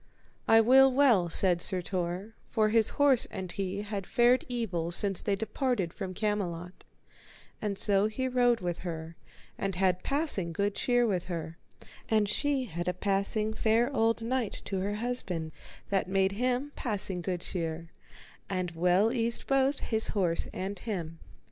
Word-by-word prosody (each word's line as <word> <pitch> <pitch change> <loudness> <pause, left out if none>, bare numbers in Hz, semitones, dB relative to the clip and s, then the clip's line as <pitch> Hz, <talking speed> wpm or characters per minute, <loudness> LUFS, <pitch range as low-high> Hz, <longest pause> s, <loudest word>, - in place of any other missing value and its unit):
I 225 0 +7
will 265 +4 +6
well, 245 -10 +4
said 175 0 +3
Sir 185 -2 0
Tor, 185 +4 -3 0.2
for 215 -1 +2
his 225 0 +3
horse 280 -4 +4
and 190 -3 -5
he 195 +1 -3
had 200 -2 -5
fared 245 +1 +4
evil 190 -9 -2
since 195 +1 +1
they 200 - 0
departed 215 - -1
from 190 -3 -6
Camelot, 185 -4 -3 0.8
and 205 -2 -2
so 200 0 +3
he 260 +4 -2
rode 245 -2 +2
with 175 -1 -3
her, 165 -2 -6 0.4
and 195 -2 -2
had 185 -1 +1
passing 275 - -1
good 200 +4 0
cheer 245 +2 +2
with 185 -6 -1
her; 165 -2 -5 0.5
and 215 -2 +3
she 275 +5 0
had 175 -4 -5
a 180 - 0
passing 200 +3 +1
fair 230 +5 +1
old 225 0 +2
knight 240 -2 -2
to 195 - -2
her 200 +2 -2
husband 195 -9 -3 0.4
that 195 -2 0
made 190 0 +2
him 250 +6 -1
passing 195 -6 -3
good 175 0 -3
cheer, 165 -2 -4 0.6
and 185 -2 -2
well 180 +7 +2
eased 235 -1 -1
both 270 +1 +2
his 220 -1 0
horse 170 -4 +1
and 195 +1 -4
him. 170 -8 -5
200 Hz, 160 wpm, -29 LUFS, 180-230 Hz, 0.8 s, I